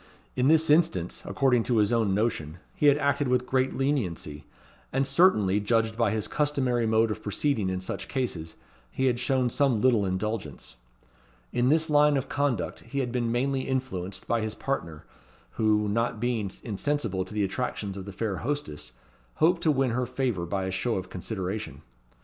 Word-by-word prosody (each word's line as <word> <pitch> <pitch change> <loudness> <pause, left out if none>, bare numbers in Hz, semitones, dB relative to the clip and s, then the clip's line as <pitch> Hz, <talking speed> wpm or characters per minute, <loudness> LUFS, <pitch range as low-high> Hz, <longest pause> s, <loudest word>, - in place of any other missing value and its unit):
In 125 +1 +2
this 160 0 +4
instance, 155 - +2
according 130 -4 +2
to 120 - +1
his 105 +2 +3
own 110 -5 +2
notion, 90 -8 -1 0.2
he 150 - +2
had 145 0 +6
acted 140 -1 +1
with 125 0 +1
great 130 0 0
leniency; 95 - -2 0.5
and 135 +1 +1
certainly, 135 - +4
judged 110 +1 +1
by 115 0 +2
his 110 -2 -1
customary 130 -6 0
mode 110 0 +3
of 110 - -5
proceeding 105 -1 0
in 95 0 -2
such 95 - -5
cases, 90 - -3 0.3
he 130 - -1
had 120 -2 +2
shown 130 -1 +1
some 135 -5 +2
little 120 -3 +3
indulgence. 95 - -3 0.8
In 125 +1 +2
this 160 +2 +3
line 150 -1 +4
of 135 - -2
conduct 140 -8 -1
he 140 - -8
had 130 -3 0
been 120 -2 -1
mainly 135 +3 0
influenced 100 -8 -3
by 115 -1 +1
his 110 0 -3
partner, 85 - -4 0.5
who, 105 -1 +2
not 115 +1 0
being 115 -4 -1
insensible 110 -3 -1
to 95 - -11
the 105 - +1
attractions 100 -1 -3
of 95 -1 -7
the 100 - -7
fair 100 0 -3
hostess, 140 - -4 0.4
hoped 170 +2 +3
to 155 - +3
win 135 -3 +1
her 125 +1 -1
favour 120 -10 -2
by 95 +2 -2
a 95 - -2
show 110 +6 -1
of 95 0 -5
consideration. 95 -5 -5
115 Hz, 180 wpm, -27 LUFS, 100-135 Hz, 0.8 s, had